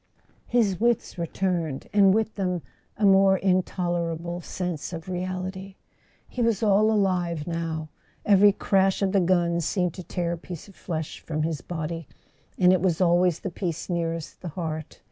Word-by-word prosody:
His 210 -7 +2
wits 235 -5 0
returned, 170 -4 -2
and 200 -2 +6
with 220 +2 +1
them 180 -5 -2 0.3
a 210 - +2
more 195 0 +6
intolerable 175 -2 -1
sense 175 -2 -4
of 165 0 -7
reality. 185 +1 -4 0.5
He 250 - -4
was 230 -2 +1
all 210 +1 +4
alive 180 -6 0
now. 165 -2 -3 0.4
Every 205 0 +6
crash 195 0 +2
of 190 - +2
the 200 - +3
guns 170 -2 +2
seemed 180 0 0
to 180 - -8
tear 175 -1 -2
a 170 - -2
piece 175 0 -8
of 200 - -15
flesh 160 -4 -5
from 155 -1 -3
his 160 -4 -2
body; 165 -1 -5 0.5
and 180 0 +5
it 185 - +2
was 175 -3 +1
always 175 -1 +3
the 195 - -4
piece 170 -1 -4
nearest 165 -2 -3
the 180 - -6
heart. 155 -2 -5
180 Hz, 165 wpm, -26 LUFS, 170-195 Hz, 0.5 s, and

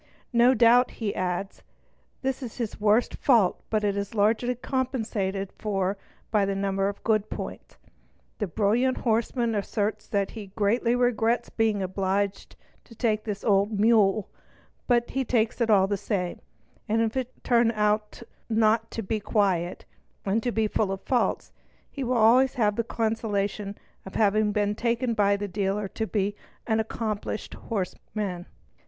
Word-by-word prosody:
no 240 +2 +5
doubt, 240 +2 +5
he 215 -3 -3
adds, 185 +2 -3 0.6
this 265 +1 -1
is 245 -4 -7
his 230 -4 -4
worst 215 +3 +3
fault 230 -10 +3
but 215 -1 0
it 200 -1 +1
is 200 +3 -4
largely 225 +4 +2
compensated 220 -7 -2
for 195 -2 -1 0.4
by 210 - +3
a 195 0 0
number 195 0 0
of 200 - -8
good 215 -2 +1
points. - - -7 0.6
The 210 - -1
brilliant 225 +8 +1
horseman 230 0 0
asserts 205 +1 -2
that 200 -2 -1
he 215 -3 -8
greatly 230 +3 +2
regrets 245 -1 +1
being 220 -3 +1
obliged 195 +1 -2 0.3
to 230 - -15
take 220 -2 0
this 205 -2 -5
"'old 200 0 +2
mule", 215 -2 +4 0.6
but 240 -1 +2
he 270 - 0
takes 230 -1 0
it 230 - +2
all 195 -3 +5
the 200 +1 -1
same; 180 -3 -2 0.5
and 225 +1 +2
if 225 +1 -2
it 255 -1 -2
should - - -32
turn 235 -1 +3
out 210 +1 0 0.3
not 225 0 +2
to 225 - -5
be 215 +3 -1
quiet 190 -5 0 0.4
and 205 +3 +1
to 245 - -1
be 220 -1 +1
full 210 -2 0
of 195 0 -5
faults, 250 -2 0 0.4
he 275 - -4
will 250 0 0
always 245 +4 +5
have 210 -4 +2
the 230 - 0
consolation 210 -3 -2 0.3
of 190 - -10
having 215 0 +3
been 205 0 +1
taken 235 +2 0
by 200 -2 +3
the 205 0 -3
dealer 200 +1 -1
to 220 +2 -3
be 205 -1 -1 0.3
"an 220 -1 +1
accomplished 215 -1 -3
horseman 190 -2 -4
"'. - - -32
215 Hz, 160 wpm, -26 LUFS, 200-230 Hz, 0.6 s, no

